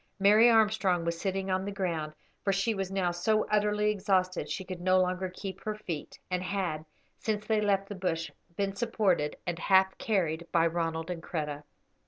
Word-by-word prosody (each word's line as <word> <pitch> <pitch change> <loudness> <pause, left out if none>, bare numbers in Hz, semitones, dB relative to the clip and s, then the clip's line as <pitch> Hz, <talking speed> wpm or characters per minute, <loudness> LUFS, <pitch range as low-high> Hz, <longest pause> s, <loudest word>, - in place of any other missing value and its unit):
Mary 210 +4 +6
Armstrong 210 -6 +3
was 170 0 -2
sitting 195 0 -1
on 185 0 +1
the 200 - -4
ground, 170 -6 -2 0.3
for 200 - +2
she 195 +4 +1
was 195 -2 -3
now 190 -2 0
so 215 +5 +1
utterly 210 0 +2
exhausted 190 -2 0
she 190 - -3
could 185 -1 -7
no 185 +1 +4
longer 185 0 0
keep 190 +1 -7
her 215 -1 -2
feet, 175 -8 -6
and 180 0 0
had, 180 -5 -2 0.4
since 210 -1 -2
they 215 -1 +2
left 195 -1 +1
the 205 - -5
bush, 175 -4 -2 0.2
been 195 0 -1
supported 195 -8 +1
and 175 -1 -3
half 190 0 +4
carried 170 -6 0
by 165 -1 +4
Ronald 165 0 -1
and 170 -2 -5
Kreta. 150 -3 -4
190 Hz, 185 wpm, -30 LUFS, 175-205 Hz, 0.4 s, Mary